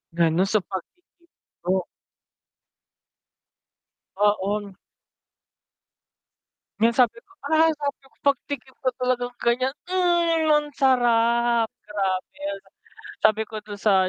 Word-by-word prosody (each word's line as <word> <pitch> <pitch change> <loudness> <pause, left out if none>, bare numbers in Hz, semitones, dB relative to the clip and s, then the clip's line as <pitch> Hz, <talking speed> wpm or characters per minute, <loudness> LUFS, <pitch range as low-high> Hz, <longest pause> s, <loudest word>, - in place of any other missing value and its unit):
Lalo 170 +1 +3
sa 215 +2 +2
pag-ti-TikTok. 190 - -6 2.3
Oo. 205 0 +1 2.1
Yung 230 +1 +4
sabi 235 -2 +3
ko, - - -27 0.2
ah, 320 0 +4
sabi 290 -1 -3
ko 270 - -24
pagtikim 275 -1 -1
ko - - +5
talagang 245 -1 0
ganyan 255 +3 +1 0.2
mhm 345 -3 +2
ang 300 0 +3
sarap 235 -3 +3 0.2
grabe. 195 -3 -3 0.8
Sabi 215 0 +3
ko 220 0 -7
dun 210 -1 -9
sa 195 -2 +3
235 Hz, 95 wpm, -24 LUFS, 205-280 Hz, 2.3 s, ko